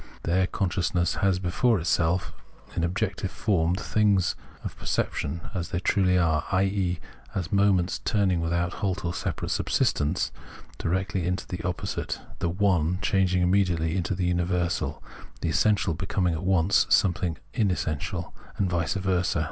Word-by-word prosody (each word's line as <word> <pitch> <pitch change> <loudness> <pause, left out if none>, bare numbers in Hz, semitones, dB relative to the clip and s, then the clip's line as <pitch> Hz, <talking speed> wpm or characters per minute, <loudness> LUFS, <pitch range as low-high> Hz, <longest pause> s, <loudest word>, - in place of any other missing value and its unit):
There 95 +3 +2
conscious 95 -3 -1
ness 90 0 +2
has 95 -2 +3
before 95 +5 +2
itself 85 +1 +1 0.4
in 85 - 0
objective 95 +1 -1
form 90 -6 +1
the 95 - -5
things 100 -4 +2 0.3
of - - -5
perception 80 +4 -2
as 90 -3 -3
they 90 - -1
truly 90 -1 +2
are, 80 -3 +2
i.e. 95 -2 +1 0.4
as 90 -4 -2
moments 100 -3 +2
turning, 95 -5 +1
without 85 +1 0
halt 95 -2 -1
or 85 - -1
separate - - -3
subsistence, 75 +5 +1 0.5
directly 95 +1 -1
into 90 0 -1
their 90 -1 -4
opposite, 90 - -3 0.2
the 85 - 0
"one" 90 -2 +2
changing 95 -3 +2
immediately 90 -3 +2
into 95 0 -1
the 90 0 -1
universal, 90 0 0 0.4
the 85 - 0
essential 100 +2 +2
becoming 90 +1 0
at 80 - -4
once 95 0 +3
something 90 -3 +2 0.2
unessential, 90 - -1 0.2
and 95 -2 0
vice 85 +1 0
versa. 95 -2 +1
90 Hz, 145 wpm, -26 LUFS, 85-95 Hz, 0.5 s, has